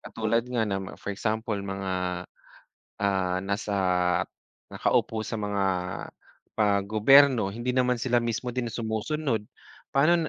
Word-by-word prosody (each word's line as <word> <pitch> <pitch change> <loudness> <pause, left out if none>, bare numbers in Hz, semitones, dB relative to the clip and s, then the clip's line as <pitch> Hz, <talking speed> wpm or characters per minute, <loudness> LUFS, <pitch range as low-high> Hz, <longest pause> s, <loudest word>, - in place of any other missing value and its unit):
katulad 115 +1 -1
nga 120 -3 +1
na 100 -2 -1
ma 95 - -7
for 100 - -5
example 110 +1 -2
mga, 95 -2 -3 0.8
ah, 95 -2 +1
nasa 100 +1 -2 0.9
nakaupo 110 -1 0
sa 115 - -4
mga 100 -1 0 0.9
pa 100 -2 +2
gobyerno, 115 +1 +5
hindi 120 +5 -3
naman 125 -1 +2
sila 120 0 +1
mismo 120 +1 -2
din 125 -1 -2
sumusunod, 115 +3 -2 0.5
paano 160 +3 +3
110 Hz, 125 wpm, -27 LUFS, 100-125 Hz, 0.9 s, gobyerno